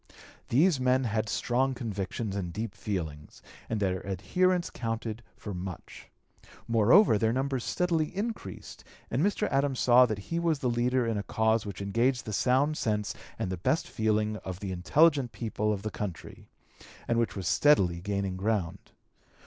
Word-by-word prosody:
These 150 +3 +4
men 130 +1 +2
had 110 -2 -1
strong 130 +2 0
convictions 105 -2 -4
and 90 -4 -3
deep 110 +3 -4
feelings, 80 -7 -5 0.3
and 110 - -1
their 95 -2 0
adherence 175 - 0
counted 115 -1 -4 0.2
for 105 - -6
much. 90 -1 -8 0.6
Moreover, 115 - +5
their 110 +1 +2
numbers 130 0 -1
steadily 170 -3 0
increased, 205 - -5 0.3
and 125 - +1
Mr. 205 +3 +1
Adams 135 -1 +1
saw 125 0 +6
that 110 -3 -2 0.2
he 170 - +1
was 165 -2 +1
the 125 -3 -1
leader 125 +1 +1
in 115 -2 -1
a 100 - -8
cause 110 0 +1
which 100 0 -5
engaged 115 +5 +1
the 110 - -5
sound 135 +7 +2
sense 105 -2 -1 0.2
and 90 - -3
the 95 - -3
best 150 - 0
feeling 110 -1 0
of 95 -3 -7
the 100 -2 -4
intelligent 140 - +3
people 105 -2 -2
of 100 -1 -3
the 110 - -3
country, 95 -6 -7 0.6
and 115 0 +2
which 115 - 0
was 95 -4 -4
steadily 90 -13 +3
gaining 100 -1 -2
ground. 100 -4 -2
115 Hz, 165 wpm, -29 LUFS, 100-130 Hz, 0.6 s, saw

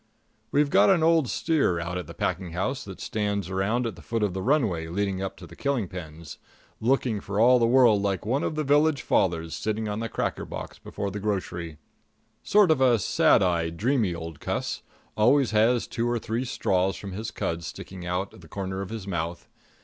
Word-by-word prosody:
We've 145 0 +2
got - - +5
an 180 -5 +4
old 160 -5 +3
steer 145 - +1
out 85 +1 -4
at 90 -4 -4
the - - -10
packing 90 -3 -2
house 100 +9 -2
that 95 -2 -9
stands 100 -3 -2
around 105 +6 0
at 115 - -3
the - - -13
foot 115 -2 -2
of 100 -4 0
the 95 - -3
runway 105 - +1
leading 95 +2 -2
up 95 - -4
to - - -10
the - - -13
killing 135 -8 -1
pens, 80 -4 -9 0.4
looking 120 -3 +1
for 100 +1 -3
all 125 +2 +6
the 115 - +3
world 120 -4 +5
like 100 -2 -1
one 130 +6 +1
of - - -2
the 155 - -1
village 145 -1 +3
fathers 80 -3 +1
sitting 110 0 -2
on 105 +1 -3
the 115 0 -3
cracker - - -2
box - - -7
before 100 -1 -5
the 105 - -5
grocery 90 -6 -3 0.6
sort 205 -4 +4
of 130 -6 +4
sad - - +4
eyed, 85 -2 0
dreamy 115 -5 +1
old 80 -2 -7
cuss - - -3 0.3
always 125 +4 +4
has 110 +3 +3
two 120 +1 -2
or 120 - +1
three 115 +3 -2
straws 95 -5 0
from 100 - -7
his 110 +4 -4
cud 85 -5 -3
sticking 95 +2 -8
out 90 +2 -2
of - - -14
the 80 - -14
corner 95 +1 -4
of 100 - -6
his 110 -3 -6
mouth. 85 -2 -4
105 Hz, 205 wpm, -26 LUFS, 90-125 Hz, 0.6 s, all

